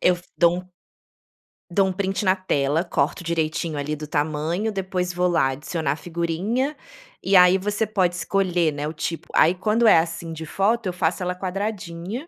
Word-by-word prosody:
Eu 180 - +4
f 175 - -16
dou 175 0 +4
um 180 - -19 1.0
dou 195 +3 +3
um 190 - 0
print 195 +2 -2
na 185 - +4
tela, 155 -4 0
corto 175 +1 -1
direitinho 160 -1 -1
ali 145 +1 -2
do 150 0 -7
tamanho, 155 +8 -1
depois 185 -2 -2
vou 180 +1 +1
lá, 170 -6 +2
"adicionar 150 +2 -2
a - - -1
figurinha", 175 - -2 0.5
e 195 - +2
aí 180 0 +7
você 210 +3 -1
pode 185 -4 +1
escolher, 180 -3 +1
né, 145 +1 -3
o 155 - -4
tipo 165 +1 -4
aí 165 - +5
quando 215 +5 +1
é 210 - +8
assim 165 0 -4
de 160 0 -7
foto 205 +6 0
eu 180 - -2
faço 170 0 -1
ela 180 0 -2
quadradinha 195 - -4
180 Hz, 185 wpm, -23 LUFS, 165-195 Hz, 1.0 s, é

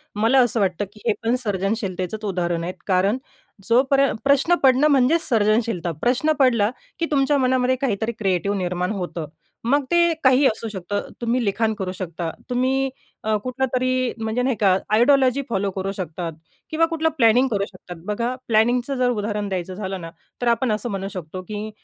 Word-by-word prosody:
मला 225 +6 +3
असं 240 -2 +2
वाटतं 195 0 0
की 210 - -16
हे - - +4
पण 235 +2 +2
सर्जनशीलतेचच 195 0 -2
उदाहरण 175 -3 -1
आहेत, 180 +2 -3
कारण 195 +5 +2 0.5
जो 235 +2 +6
पर्यं 275 0 +3
प्रश्न 280 +5 +4
पडणं 265 +3 +5
म्हणजेच 280 +5 +3
सर्जनशीलता. 215 -5 +1
प्रश्न 255 +6 +2
पडला 235 -6 +4 0.3
की 335 - +1
तुमच्या 280 0 +3
मनामध्ये 255 -1 +2
काहीतरी 225 -3 0
क्रिएटिव्ह 195 0 0
निर्माण 180 0 -1
होतं. 175 -5 -4 0.4
मग 280 +4 +2
ते 340 -1 +4
काही 260 +2 +5
असू 225 -2 +1
शकतं. 205 0 -4
तुम्ही 235 +1 0
लिखाण 220 +2 +1
करू 190 -3 -4
शकता, 170 -2 -4 0.2
तुम्ही 260 +2 +1 0.4
अ, 215 0 +2
कुठलं 255 +1 -1
तरी 255 0 +1
म्हणजे 220 +3 -1
नाही 255 -1 +1
का 195 -3 +4 0.2
आयडियॉलॉजी 260 +3 +4
फॉलो 200 -2 0
करू 190 +1 -3
शकतात. 170 -1 -4 0.4
किंवा 325 +1 +3
कुठलं 325 -1 0
प्लॅनिंग 245 +2 +5
करू 200 -2 0
शकतात. 185 -2 -11
बघा 235 +4 -2
प्लॅनिंगचं 240 +4 +2
जर 250 -1 +2
उदाहरण 210 -2 -2
द्यायचं 185 -1 -3
झालं 190 -1 -5
ना, 165 - -7 0.3
तर 245 - 0
आपण 235 +1 +2
असं 215 +3 -2
म्हणू 195 -2 -3
शकतो 185 0 -6
की 215 0 -5
220 Hz, 175 wpm, -22 LUFS, 195-255 Hz, 0.5 s, जो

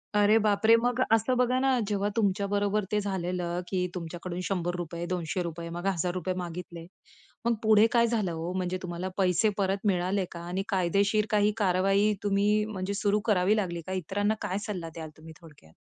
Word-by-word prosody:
अरे 210 +1 +5
बापरे! 215 +2 +4
मग 245 +1 0
असं 225 +3 +3
बघा 250 +1 +2
ना, 265 -1 +2
जेव्हा 205 -1 0
तुमच्या 200 -2 +1
बरोबर 205 +1 0
ते 210 - +2
झालेलं 180 -3 -2
की 180 -2 -1
तुमच्याकडून 175 +1 -5
₹100 175 -2 -3
₹200 170 -1 -3
मग 175 +2 -6
₹1,000 180 0 -1
मागितले. 170 -1 -6 0.6
मग 235 - +2
पुढे 215 0 +6
काय 235 -1 +4
झालं 215 -6 0
हो? 165 +1 -4
म्हणजे 185 0 -2
तुम्हाला 180 +1 -4
पैसे 190 +2 +3
परत 195 +1 -1
मिळाले 185 +1 +1
का? 170 - -7
आणि 185 +2 -2
कायदेशीर 200 +3 +2
काही 210 0 +3
कारवाई 195 +1 +2
तुम्ही 205 +1 +2
म्हणजे 200 -2 -4
सुरू 205 +1 +1
करावी 200 -1 +3
लागली 175 -4 -2
का? 190 - -3
इतरांना 200 +4 0
काय 200 -2 -2
सल्ला 180 -6 -4
द्याल 160 -1 -6
तुम्ही 160 0 -12
थोडक्यात? 145 - -17
190 Hz, 170 wpm, -28 LUFS, 175-210 Hz, 0.6 s, पुढे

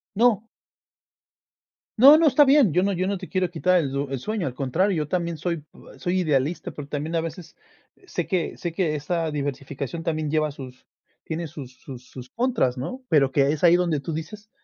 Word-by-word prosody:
¡No! 230 -1 +4 1.6
No 280 +5 +9
no, 325 0 +4
está 290 +1 +6
bien, 270 - +5
yo 180 - +3
no 200 0 +1
yo 185 0 -1
no 200 0 -1
te 185 0 -9
quiero 185 -3 0
quitar 180 +2 +2
el 140 -3 -1
el 135 - -3
sueño, 205 - -2
al 125 - -4
contrario, 170 +10 0
yo 150 - -1
también 170 -1 -2
soy 170 +2 -2
p 150 -1 -14 0.3
soy 185 0 0
idealista, 155 +3 0
pero, 145 -2 -8
también 150 +3 -3
a 165 - +2
veces 165 0 -8 0.5
sé 175 - -4
que 180 -4 -1
sé 175 - -4
que 165 -4 0
esa 165 +2 -2
diversificación 140 +1 -4
también 155 -2 -2
lleva 155 -1 +1
sus 130 -2 -11 0.4
tiene 165 0 -4
sus 135 -3 -10
sus 125 -2 -11
sus 130 -1 -10
contras, 235 - 0
¿no? 250 - -5
Pero, 140 -5 +4
que 140 +1 +3
es 155 +1 -4
ahí 175 0 +7
donde 170 -4 +1
tú 165 +3 -5
dices, 210 +7 -7
165 Hz, 200 wpm, -24 LUFS, 145-185 Hz, 1.6 s, No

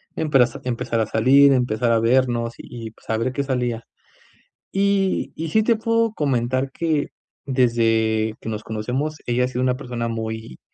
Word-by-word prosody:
empre 150 -5 +3 0.2
empezar 120 -2 -2
a 110 - +2
salir, 135 +6 +5
empezar 120 -2 +1
a 115 - +4
vernos, 120 -1 +1
y 115 -2 -8
pues - - -24
a 110 - +1
ver 120 +3 -1
que 140 +1 -2
salía. 125 -4 -2 0.9
Y, 195 -1 +1
y 160 0 -4
sí 220 +6 +3
te 230 +1 +3
puedo 230 0 +1
comentar 130 -1 0
que 160 -3 -1 0.4
desde 115 -4 +1
que - - -7
nos 110 -1 -4
conocemos, 125 +8 -3
ella 125 +1 +1
ha - - 0
sido 125 0 -3
una 130 0 +1
persona 120 -3 -4
muy, 110 - -5
125 Hz, 170 wpm, -22 LUFS, 115-140 Hz, 0.9 s, salir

